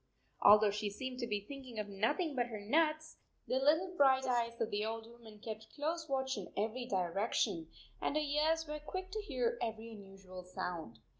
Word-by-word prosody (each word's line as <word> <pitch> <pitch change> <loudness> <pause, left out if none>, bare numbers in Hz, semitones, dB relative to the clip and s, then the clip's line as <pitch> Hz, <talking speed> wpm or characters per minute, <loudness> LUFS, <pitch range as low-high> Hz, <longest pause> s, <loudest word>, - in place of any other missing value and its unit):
Although 210 0 +8
she 210 0 -1
seemed 255 +5 -5
to 240 - -2
be 210 -2 -1
thinking 260 -2 -8
of 210 -1 -2
nothing 230 - 0
but 245 -2 +1
her 220 -3 -5
nuts, 310 +8 +1 0.3
the 260 - +2
little 320 +7 +3
bright 265 -3 +5
eyes 235 -2 0
of 225 -1 0
the 205 +1 0
old 225 +1 -3
woman 230 -2 -13
kept 220 0 -8
close 315 +2 -2
watch 265 -2 0
in 185 - -8
every 225 +4 -1
direction, 190 -2 0 0.3
and - - 0
her - - +4
ears 310 +2 +2
were 300 0 -4
quick 375 +5 -5
to 430 +1 -2
hear 470 +3 -1
every 225 0 -3
unusual 195 -3 -10
sound. 175 -8 -5
235 Hz, 190 wpm, -35 LUFS, 210-295 Hz, 0.3 s, Although